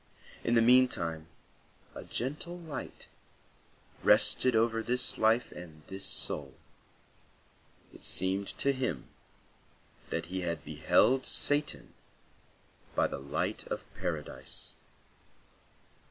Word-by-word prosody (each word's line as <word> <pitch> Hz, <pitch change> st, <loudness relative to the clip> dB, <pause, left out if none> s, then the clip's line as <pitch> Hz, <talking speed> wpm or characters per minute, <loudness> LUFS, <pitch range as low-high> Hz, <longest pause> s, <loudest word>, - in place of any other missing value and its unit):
In 120 Hz, -, +1 dB
the 115 Hz, -, +5 dB
meantime 115 Hz, -11 st, +3 dB, 0.7 s
a -, -, -8 dB
gentle 150 Hz, +8 st, -4 dB
light 160 Hz, -5 st, -8 dB, 0.9 s
rested 130 Hz, -2 st, +4 dB
over 115 Hz, 0 st, +2 dB
this 125 Hz, +3 st, +1 dB
life 110 Hz, +2 st, +2 dB
and 80 Hz, -3 st, -12 dB
this 95 Hz, 0 st, -3 dB
soul. 70 Hz, -3 st, +1 dB, 1.4 s
It -, -, -15 dB
seemed 95 Hz, +2 st, +3 dB
to 140 Hz, -, +1 dB
him 125 Hz, -, -4 dB, 1.0 s
that 85 Hz, 0 st, -3 dB
he 95 Hz, +2 st, -4 dB
beheld 130 Hz, -, +1 dB
Satan 145 Hz, +1 st, +3 dB, 1.0 s
by -, -, +2 dB
the -, -, -4 dB
light 70 Hz, +1 st, -3 dB
of -, -, -5 dB
Paradise. -, -, -4 dB
115 Hz, 95 wpm, -30 LUFS, 85-130 Hz, 1.4 s, the